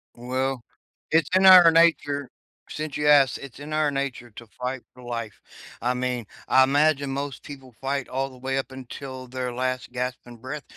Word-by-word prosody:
Well, 130 Hz, +1 st, -2 dB, 0.5 s
it's 160 Hz, -2 st, +3 dB
in 190 Hz, +1 st, +4 dB
our 180 Hz, -3 st, +10 dB
nature 145 Hz, -4 st, +2 dB, 0.4 s
since 155 Hz, -2 st, -5 dB
you 150 Hz, -, 0 dB
asked, 140 Hz, -4 st, +5 dB
it's 140 Hz, -1 st, -11 dB
in 150 Hz, +1 st, -7 dB
our 155 Hz, -1 st, +1 dB
nature 135 Hz, -4 st, -4 dB
to 120 Hz, -, -10 dB
fight 125 Hz, 0 st, -3 dB
for 125 Hz, 0 st, -15 dB
life. 115 Hz, -4 st, -6 dB, 0.4 s
I 125 Hz, +2 st, +1 dB
mean, 125 Hz, -2 st, -2 dB, 0.2 s
I 130 Hz, -, +6 dB
imagine 140 Hz, 0 st, +2 dB
most 140 Hz, 0 st, -4 dB
people 135 Hz, -4 st, -11 dB
fight 135 Hz, 0 st, -2 dB
all 135 Hz, +1 st, -2 dB
the 130 Hz, -, -15 dB
way 135 Hz, +1 st, -2 dB
up 135 Hz, -1 st, -3 dB
until 130 Hz, 0 st, -8 dB
their 125 Hz, -1 st, -4 dB
last, 130 Hz, 0 st, -3 dB
gasping 125 Hz, -1 st, -5 dB
breath 140 Hz, +5 st, -7 dB
130 Hz, 180 wpm, -25 LUFS, 125-145 Hz, 0.5 s, our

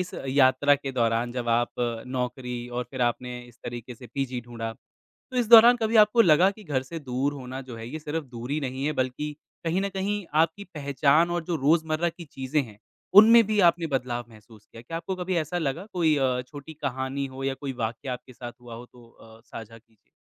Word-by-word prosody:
इस 180 Hz, 0 st, -3 dB, 0.2 s
यात्रा 135 Hz, +1 st, +4 dB
के 135 Hz, -1 st, -5 dB
दौरान 115 Hz, -1 st, 0 dB
जब 120 Hz, -1 st, -4 dB
आप 120 Hz, +1 st, +2 dB, 0.5 s
नौकरी 125 Hz, 0 st, -3 dB
और 125 Hz, 0 st, -3 dB
फ़िर 130 Hz, -2 st, -2 dB
आपने 125 Hz, +1 st, -2 dB
इस 120 Hz, 0 st, -19 dB
तरीक़े 120 Hz, +1 st, -7 dB
से 125 Hz, +2 st, -12 dB
पीजी 130 Hz, 0 st, -3 dB
ढूँढा 115 Hz, -1 st, -6 dB, 0.6 s
तो 255 Hz, -, -3 dB
इस 240 Hz, -3 st, +1 dB
दौरान 235 Hz, +1 st, +10 dB
कभी 225 Hz, 0 st, -1 dB
आपको 215 Hz, +2 st, +6 dB
लगा 175 Hz, +1 st, +5 dB
कि 215 Hz, +1 st, -14 dB
घर 145 Hz, -7 st, -1 dB
से 165 Hz, +5 st, -7 dB
दूर 135 Hz, +1 st, -2 dB
होना 130 Hz, -1 st, -7 dB
जो 120 Hz, -, -6 dB
है 115 Hz, 0 st, -8 dB
ये 155 Hz, +3 st, -6 dB
सिर्फ़ 150 Hz, +1 st, -4 dB
दूरी 125 Hz, +4 st, -4 dB
नहीं 135 Hz, +1 st, -3 dB
है 155 Hz, -, 0 dB
बल्कि 145 Hz, +4 st, -4 dB, 0.3 s
कहीं 175 Hz, +4 st, +1 dB
न 200 Hz, -, -1 dB
कहीं 195 Hz, +1 st, -2 dB, 0.2 s
आपकी 200 Hz, +5 st, -1 dB
पहचान 150 Hz, +3 st, +2 dB
और 175 Hz, -1 st, -1 dB
जो 170 Hz, 0 st, -2 dB
रोज़मर्रा 160 Hz, +3 st, +1 dB
की 170 Hz, +1 st, -11 dB
चीज़ें 135 Hz, +1 st, -2 dB
हैं। 105 Hz, -4 st, -13 dB, 0.4 s
उनमें 230 Hz, +1 st, +7 dB
भी 215 Hz, -1 st, +1 dB
आपने 170 Hz, -1 st, -3 dB
बदलाव 125 Hz, -3 st, -2 dB
महसूस 110 Hz, -1 st, -17 dB
किया, 115 Hz, -, -13 dB
क्या 165 Hz, +7 st, -5 dB
आपको 190 Hz, +2 st, -4 dB
कभी 185 Hz, 0 st, -2 dB
ऐसा 160 Hz, +2 st, -2 dB
लगा 165 Hz, +3 st, -2 dB
कोई 160 Hz, -4 st, +3 dB
अ, 130 Hz, -2 st, +1 dB
छोटी 145 Hz, +2 st, -10 dB
कहानी 135 Hz, -1 st, -3 dB
हो 135 Hz, 0 st, -8 dB
या 135 Hz, 0 st, 0 dB
कोई 135 Hz, 0 st, -6 dB
वाक़या 120 Hz, +4 st, -3 dB
आपके 125 Hz, +1 st, -10 dB
साथ 120 Hz, 0 st, -8 dB
हुआ 120 Hz, -1 st, -9 dB
हो 120 Hz, +2 st, -10 dB
तो 120 Hz, -1 st, -18 dB
अ, 110 Hz, -1 st, -17 dB
साझा 115 Hz, 0 st, -10 dB
कीजिए? 110 Hz, -2 st, -29 dB
135 Hz, 215 wpm, -26 LUFS, 125-165 Hz, 0.6 s, दौरान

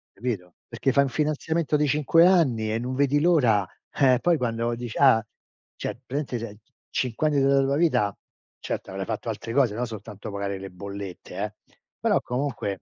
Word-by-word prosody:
Capito? 100 Hz, -7 st, -4 dB
Perché 120 Hz, +3 st, 0 dB
fai 140 Hz, +1 st, +4 dB
un 135 Hz, -, -1 dB
finanziamento 155 Hz, +2 st, 0 dB
di 150 Hz, 0 st, +2 dB
5 150 Hz, +4 st, +4 dB
anni, 130 Hz, -13 st, +3 dB
e 115 Hz, -, 0 dB
non 125 Hz, +2 st, -3 dB
vedi 140 Hz, +1 st, +2 dB
l'ora, 125 Hz, -, +4 dB, 0.3 s
eh 130 Hz, -3 st, +4 dB
poi 175 Hz, -2 st, +3 dB
quando 115 Hz, -1 st, -1 dB
dici: 120 Hz, -1 st, -6 dB
"Ah". 125 Hz, -5 st, +5 dB, 0.5 s
Cioè -, -, -4 dB
praticamente 135 Hz, -2 st, -3 dB
se 110 Hz, -2 st, -7 dB
c 110 Hz, -, -34 dB, 0.2 s
5 125 Hz, +4 st, 0 dB
anni 145 Hz, -2 st, +2 dB
della 135 Hz, 0 st, +4 dB
tua 140 Hz, +1 st, +1 dB
vita 125 Hz, -12 st, +2 dB, 0.4 s
certo -, -, -5 dB
avrei -, -, -4 dB
fatto -, -, -4 dB
altre 115 Hz, 0 st, -5 dB
cose, 125 Hz, -6 st, +3 dB
no 120 Hz, +2 st, -1 dB
soltanto 105 Hz, -2 st, -8 dB
pagare 100 Hz, -1 st, -3 dB
le 95 Hz, -, -7 dB
bollette 100 Hz, 0 st, -8 dB
eh, -, -, -3 dB, 0.5 s
però -, -, +2 dB
comunque 125 Hz, -7 st, -3 dB
125 Hz, 185 wpm, -25 LUFS, 110-145 Hz, 0.5 s, Ah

